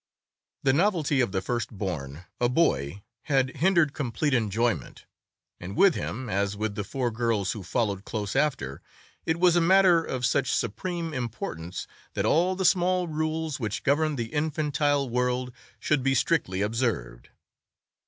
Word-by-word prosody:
The 135 - +4
novelty 155 -5 +2
of 120 - 0
the 95 -1 -2
first 120 +3 -2
born, 80 -4 -4
a 120 - +2
boy, 100 - +1 0.2
had 135 -2 +1
hindered 170 -2 +3
complete 140 +2 -1
enjoyment, 110 - -1 0.5
and 95 +3 -7
with 195 -3 +6
him, 130 -1 -4
as 100 -1 -1
with 110 0 -2
the 105 - -3
four 125 +3 -2
girls 110 -4 0
who 110 - -5
followed 100 +1 -1
close 105 -1 -4
after, 70 - 0 0.5
it 160 +1 +1
was 175 -1 +5
a 175 - +4
matter 180 -1 +5
of 130 -5 -2
such 130 +1 +1
supreme 165 - -2
importance 95 - -5 0.3
that - - 0
all 180 +4 +3
the 190 0 -2
small 180 0 +3
rules 155 -1 -2
which 110 -4 -3
governed 150 +1 +2
the 115 -1 -4
infantile 145 -2 0
world 125 +1 -1 0.3
should 150 -3 +1
be 135 +1 +2
strictly 110 - +1
observed. 110 - -2
130 Hz, 155 wpm, -27 LUFS, 105-155 Hz, 0.5 s, with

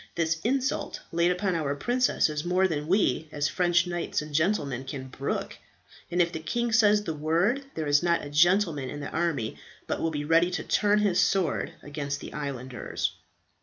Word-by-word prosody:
This 165 -1 0
insult 265 +3 -1
laid 170 +1 +2
upon 185 +1 0
our 150 -4 -1
princess 245 - +2
is 150 -1 -3
more 185 +2 +2
than 150 -3 -3
we, 160 -5 +1
as 145 -1 0
French 175 0 +2
knights 175 -1 -2
and 150 0 -7
gentlemen, 145 -6 0
can 135 -1 -7
brook; 135 +2 -4 0.5
and 175 - -1
if 170 -1 +3
the 160 - -4
king 235 +8 -1
says 210 -1 +4
the 165 - -3
word, 170 - +1
there 160 - -2
is 145 0 +4
not 170 -3 +1
a - - -7
gentleman 165 -3 +3
in 145 - -6
the 140 - -6
army 160 -9 -1 0.3
but - - -3
will 165 - +1
be 145 -2 -3
ready 165 +3 +4
to 180 - -3
turn 205 0 +2
his 205 -4 +2
sword 185 -6 +1
against 145 -1 -4
the - - -9
islanders." 130 -4 -3
165 Hz, 190 wpm, -27 LUFS, 145-185 Hz, 0.5 s, says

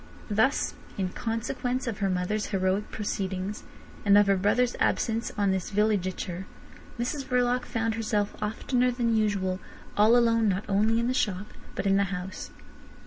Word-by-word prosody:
Thus 220 +7 +2 0.2
in 190 -2 0
consequence 245 +4 -2
of 225 -4 -3
her 195 -2 +1
mother's 185 +4 -1
heroic 195 +1 0
proceedings, 195 -1 -3 0.4
and 200 -1 +6
of 205 - +6
her 195 0 +3
brother's 235 +6 +2
absence 225 +1 +1
on 200 -2 +2
this 190 -1 -1
villegiature, 190 -3 0 0.5
Mrs 250 +4 -2
Verloc 250 -1 +1
found 225 -1 -1
herself 215 -2 -1
oftener 245 +4 +1
than 240 -2 +1
usual 200 -4 +1 0.4
all 220 +3 +6
alone 230 -2 +3
not 195 +1 -1
only 215 +3 +2
in 235 - 0
the 255 - +1
shop, 205 -4 -1 0.2
but - - -3
in 195 0 +4
the 200 - +3
house. 190 0 -5
210 Hz, 155 wpm, -27 LUFS, 195-230 Hz, 0.5 s, and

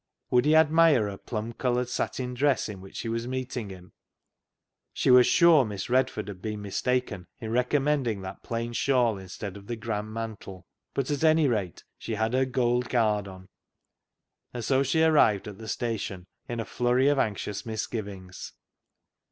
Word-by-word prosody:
Would 125 +1 +4
he 155 +1 +4
admire 160 -7 +5
her 100 - -8
plum 115 0 -5
coloured 125 0 0
satin 125 0 -3
dress 135 0 +1
in 100 -3 -8
which 95 - -13
she - - -4
was 115 +1 -2
meeting 125 -4 -4
him? 90 -2 -12 1.0
She - - +2
was 125 -1 +7
sure 170 -4 +6
Miss 105 0 -5
Redford 130 -4 +1
had 95 -3 -8
been 105 -1 -4
mistaken 105 -2 -2
in 110 -1 -5
recommending 125 -2 +1
that 95 0 -8
plain 115 0 -4
shawl 120 -5 +2
instead 95 +1 -7
of 100 0 -12
the 120 - -3
grand 110 -1 -4
mantle. 110 -5 -7 0.3
But, 135 +1 -1
at 145 +1 -1
anyrate, 135 - +2 0.2
she 110 - -4
had 110 +2 -1
her 130 +1 +3
gold 125 -1 0
guard 105 -4 +1
on, 95 -1 -11 1.0
and 120 -3 -5
so 135 -1 +3
she 160 +4 +2
arrived 145 -12 +4
at 105 -1 -9
the 110 - -9
station 105 -6 -3 0.2
in 120 -1 -3
a 115 - -2
flurry 125 +2 +1
of 145 -1 +3
anxious 105 -2 -2
misgivings. 100 -4 -6
115 Hz, 170 wpm, -27 LUFS, 105-130 Hz, 1.0 s, was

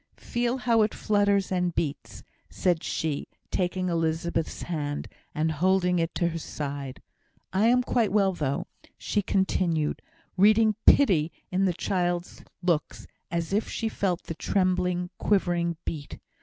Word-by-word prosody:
Feel 240 +1 -1
how 235 -3 +3
it 215 - +1
flutters 200 -2 +2
and 180 -2 0
beats," 145 -4 -3 0.3
said 175 -3 +1
she, 155 -3 -2 0.2
taking 185 0 0
Elizabeth's 165 -1 -1
hand, 145 -4 -3 0.3
and 160 +1 +1
holding 180 +2 +2
it 165 0 -1
to 170 - +1
her 165 0 -4
side. 140 -3 -5 0.5
"I 200 +4 +3
am 250 +1 +4
quite 235 -5 +1
well, 195 -2 +3
though," 145 -5 -2 0.3
she 210 - 0
continued, 180 -5 0 0.4
reading 215 +3 +5
pity 175 - +5 0.2
in 190 +1 +2
the 185 - +2
child's 175 0 -2 0.2
looks, 170 -4 0 0.2
as 170 +1 -2 0.2
she 225 - -1
felt 185 -5 -1
the - - -5
trembling, 180 0 0
quivering 175 -4 +1
beat. 145 -3 -5
180 Hz, 135 wpm, -27 LUFS, 165-195 Hz, 0.5 s, reading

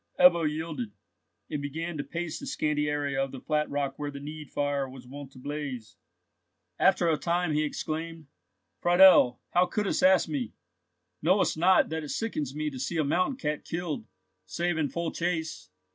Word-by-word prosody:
Ebbo 170 -3 +6
yielded, 150 -8 -4 0.6
and 150 - -2
began 160 +4 -4
to 145 - -3
pace 170 +2 -4
the 280 - -7
scanty 150 - 0
area 145 -2 0
of 135 - -4
the 135 - -7
flat 150 +2 0
rock 140 -1 -2
where 145 -1 -2
the 140 -1 -7
need 150 +1 -8
fire 145 -2 -1
was 130 -1 -11
wont 135 +1 -9
to 135 - -16
blaze. 135 -4 -5 0.8
After 185 -2 +4
a 160 -2 +3
time 170 -1 0
he 150 - +2
exclaimed: 160 +1 -4 0.5
"Friedel, 175 -8 +6
how 180 +1 +4
couldst 205 +2 -1
ask 185 -1 +5
me? 140 -8 -3 0.7
Knowst 185 +5 +3
not 180 +4 +4
that 160 0 -3
it 150 - -7
sickens 150 - -3
me 150 0 -2
to 130 - -7
see 165 +6 -2
a 155 - +3
mountain 180 - +1
cat 150 - -2
killed, 175 +5 -4 0.4
save 175 0 -1
in 155 -3 0
full 170 +4 -2
chase. 165 -2 -3
155 Hz, 175 wpm, -28 LUFS, 145-170 Hz, 0.8 s, Ebbo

